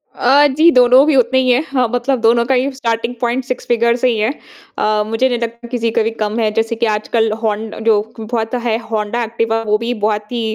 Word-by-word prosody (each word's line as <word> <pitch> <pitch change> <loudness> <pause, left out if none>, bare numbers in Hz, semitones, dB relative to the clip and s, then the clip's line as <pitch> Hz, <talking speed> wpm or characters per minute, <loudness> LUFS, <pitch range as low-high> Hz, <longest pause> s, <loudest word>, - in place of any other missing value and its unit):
अ, 285 +4 +4
जी 330 +2 +6
दोनों 250 +1 +5
भी 305 - +3
उतने 260 0 +3
ही 255 -1 +1
हैं। 250 +4 +3
हाँ 255 -3 0
मतलब 245 +1 -1
दोनों 235 +1 +3
का 265 - +1
ही 260 +3 0
स्टार्टिंग 230 -2 -2
पॉइंट 245 +2 -1
6 255 - -5
फ़िगर 235 0 +2
से 255 +1 0
ही 230 - -1
है। 215 +3 0 0.5
अ, 215 0 +1
मुझे 225 +4 +1
नहीं 245 - -1
लगता 235 +1 -6
किसी 235 -2 -2
का 225 - +3
भी 225 - 0
कम 215 +2 -1
है 220 -2 +1
जैसे 225 +1 -1
कि 230 +1 -1
आजकल 220 +1 0
होंड 215 0 -2
जो 215 -2 +4 0.2
बहुत 225 +1 -3
है 225 -2 +1
होंडा 220 +2 -1
एक्टिवा 225 0 -1
वो 210 0 +2
भी 235 +2 -3
बहुत 210 +1 -1
ही 240 -1 -2
235 Hz, 235 wpm, -16 LUFS, 225-250 Hz, 0.5 s, जी